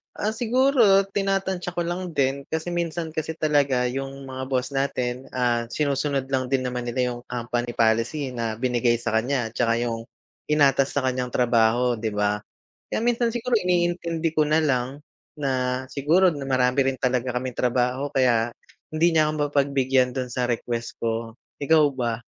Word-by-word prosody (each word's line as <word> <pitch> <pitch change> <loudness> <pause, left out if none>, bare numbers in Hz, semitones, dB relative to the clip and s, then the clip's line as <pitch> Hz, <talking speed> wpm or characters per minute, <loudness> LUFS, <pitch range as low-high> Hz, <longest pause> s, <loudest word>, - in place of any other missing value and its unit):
Ah, 210 - -1
siguro 235 -2 +4
tinatantya 195 -2 -1
ko 175 - -1
lang 175 +1 -3
din 140 -1 0
kasi 160 +3 -3
minsan 170 -1 -2
kasi 160 0 -3
talaga 140 -5 +1
yung 135 +1 -6
mga 130 0 -5
boss 130 -1 -1
natin, 130 -2 -2
ah, 120 -2 +1
sinusunod 140 -2 -1
lang 130 -1 0
din 135 - +3
naman 125 -1 -3
nila, 120 +2 -3
ah, - - +2
yung - - -11
company 120 0 -3
policy 115 +6 +1
na 115 -3 -3
binigay 120 +1 +1
sa - - -2
kanya 120 +2 0
'tsaka 115 0 +1
yung 115 -1 -3 0.4
inatas 140 -3 +3
sa 145 - +1
kanyang 125 -1 -2
trabaho, 120 0 +3
'di 110 -1 -3
ba? 105 0 +1 0.5
Kaya 225 - -2
minsan 240 0 +2
siguro 240 +2 -4
iniintindi 175 -2 0
ko 155 -2 +2
nalang 140 -4 +1 0.4
na, 130 -2 -1
siguro 170 +6 +3
marami 135 -2 +1
rin 135 - -1
talaga 125 -1 -1
kaming 130 +1 -2
trabaho 125 +3 0
kaya 120 -4 +2 0.4
hindi 165 +2 +2
niya 155 -1 +3
ako - - -1 0.2
mapagbigyan 135 -2 +2
dun 125 -2 -3
sa 125 -1 -1
request 120 0 -3
ko, 115 0 -2 0.2
ikaw 155 +2 +4
ba? 120 -3 -3
135 Hz, 160 wpm, -24 LUFS, 125-155 Hz, 0.5 s, siguro